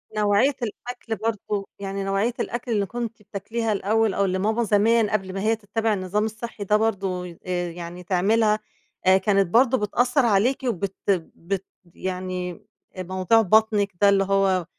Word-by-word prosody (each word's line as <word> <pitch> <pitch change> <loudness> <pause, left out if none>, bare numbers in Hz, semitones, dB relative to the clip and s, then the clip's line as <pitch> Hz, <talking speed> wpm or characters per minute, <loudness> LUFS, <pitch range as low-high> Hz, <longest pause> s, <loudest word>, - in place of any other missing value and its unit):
نوعية 210 +6 +3
الأكل 235 +1 -5
برضه، 210 -2 -3
يعني 195 0 -4
نوعية 195 +5 0
الأكل 240 0 -3
اللي 205 -3 +1
كنتِ 230 +2 -5
بتاكليها 215 +2 -3
الأول 215 +1 +1
أو 200 - +1
اللي 185 0 -1
ماما 220 +4 +1
زمان 220 +1 +3
قبل 190 -3 -2
ما 195 - -3
هي 220 +2 +2
تتبِّع 220 +1 -1
النظام 200 +2 -1
الصحي 220 0 -6
ده 210 +1 +3
برضه، 195 -4 -1
ي 170 -2 -11
آآ، 175 -1 -2
يعني 175 +1 -8
تعملها 210 +4 +2 0.5
آآ، 185 +1 +6
كانت 195 0 +2
برضه 250 +7 +4
بتأثّر 245 +5 +1
عليكِ، 230 +4 +3
وبت 200 -4 -2 0.4
بت 195 +2 -4 0.3
يعني 185 -1 -4 0.4
أ - - -2
موضوع 185 +5 +2
بطنِك 215 0 +3
ده 200 - +7
اللي 195 -1 +4
هو 195 -2 +2
205 Hz, 160 wpm, -24 LUFS, 190-225 Hz, 0.5 s, ده